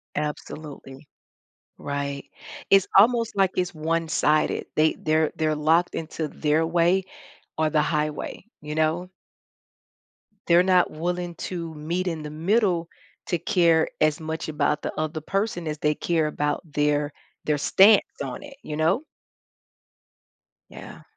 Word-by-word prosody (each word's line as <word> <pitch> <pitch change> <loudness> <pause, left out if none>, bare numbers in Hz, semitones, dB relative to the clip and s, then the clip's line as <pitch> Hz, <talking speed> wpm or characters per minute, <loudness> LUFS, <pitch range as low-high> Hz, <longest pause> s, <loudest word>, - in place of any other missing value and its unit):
Absolutely. 150 -2 -6 0.7
Right. 140 -1 -4 0.4
It's 195 -1 +5
almost 230 +2 +4
like 195 -2 +3
it's 180 -1 0
one-sided. 155 -1 0
They 155 +1 +3
they're 155 0 +1
they're 155 -1 0
locked 160 +4 +2
into 160 -1 -4
their 155 +2 +1
way 175 +3 +2 0.6
or 155 -1 +2
the 150 0 +2
highway, 150 -1 -2 0.2
you 150 0 -6
know? 160 +3 0 1.4
They're 170 +1 +6
not 185 -1 +3
willing 175 +2 -3 0.2
to 170 -3 -5
meet 170 +5 -3
in 165 -3 -2
the 150 - -6
middle 175 +2 +1 0.4
to 175 - 0
care 165 -3 +3
as 155 -1 +3
much 160 0 -4
about 150 -1 0
the - - -3
other 155 0 -2
person 195 0 -2
as 150 -1 -4
they 150 0 +1
care 160 -1 0
about 150 -1 -1
their 145 0 +1 0.3
their 150 -1 +1
stance 200 +8 +4
on - - -6
it, 285 -1 -11
you 150 - -5
know? 180 - +1 1.7
Yeah. - - -11
160 Hz, 135 wpm, -24 LUFS, 150-175 Hz, 1.7 s, They're